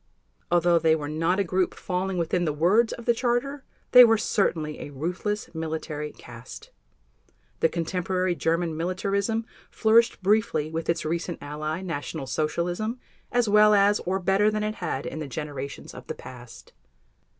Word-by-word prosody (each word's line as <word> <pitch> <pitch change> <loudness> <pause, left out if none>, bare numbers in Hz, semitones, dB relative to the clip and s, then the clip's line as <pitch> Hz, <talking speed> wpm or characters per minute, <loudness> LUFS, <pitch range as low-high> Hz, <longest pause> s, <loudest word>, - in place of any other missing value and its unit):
Although 175 0 +4
they 160 -1 +4
were 150 -2 -4
not 165 +5 0
a - - +3
group 185 0 0
falling 185 0 -2
within 175 +1 0
the 155 -3 0
words 195 +10 +3
of 235 - -7
the 235 - +4
Charter, 255 +4 -1 0.3
they 250 0 +11
were 225 -1 +5
certainly 160 -8 -1
a - - -7
ruthless 180 +10 -3
military 155 -2 -4
caste. - - -12 0.9
The 165 - +3
contemporary 180 +2 -1
German 165 0 0
militarism 200 +6 -1 0.2
flourished 230 -2 +3
briefly 200 -7 +1
with 160 0 -4
its 170 - 0
recent 170 +2 -2
ally, 155 +4 -4
National 160 -3 -4
Socialism, 175 - -2 0.3
as 245 -2 +2
well 210 0 +6
as 205 +1 +4
or 185 +2 -1
better 195 +3 +2
than 215 0 -1
it 215 0 -1
had - - -3
in 155 - -5
the 155 - -4
generations 140 -1 -6
of - - -11
the - - -4
past. 125 -2 -12
175 Hz, 160 wpm, -26 LUFS, 160-210 Hz, 0.9 s, they